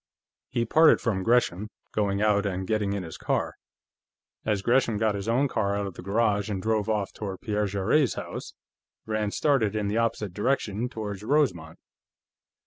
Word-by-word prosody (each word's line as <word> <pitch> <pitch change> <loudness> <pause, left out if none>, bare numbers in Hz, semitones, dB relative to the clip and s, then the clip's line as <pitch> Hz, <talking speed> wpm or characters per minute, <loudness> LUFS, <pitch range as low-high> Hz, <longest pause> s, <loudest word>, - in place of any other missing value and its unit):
He 115 - 0
parted 160 +7 +5
from 100 -5 -1
Gresham, 105 -3 +1 0.2
going 100 -1 0
out 105 -1 +3
and 95 -2 -2
getting 105 0 0
in 100 -2 -3
his 80 -2 -9
car. - - -1 0.9
As 105 -3 0
Gresham 120 -2 +2
got 110 0 +1
his 100 +1 -5
own 125 +5 +2
car 100 -5 0
out 100 - -1
of 100 - -5
the - - -9
garage 105 +1 +1
and 100 -2 -2
drove 110 +1 0
off 105 -3 -1
toward 95 -3 -6
Pierre 105 -3 0
Jarrett's 100 +8 +1
house, - - -7 0.5
Rand 110 -1 -2
started 120 -9 +2
in 105 -2 -1
the 105 - -1
opposite 110 -4 -1
direction, 110 +1 -1
toward 105 -4 -5
Rosemont. 105 - 0
105 Hz, 170 wpm, -27 LUFS, 100-115 Hz, 0.9 s, parted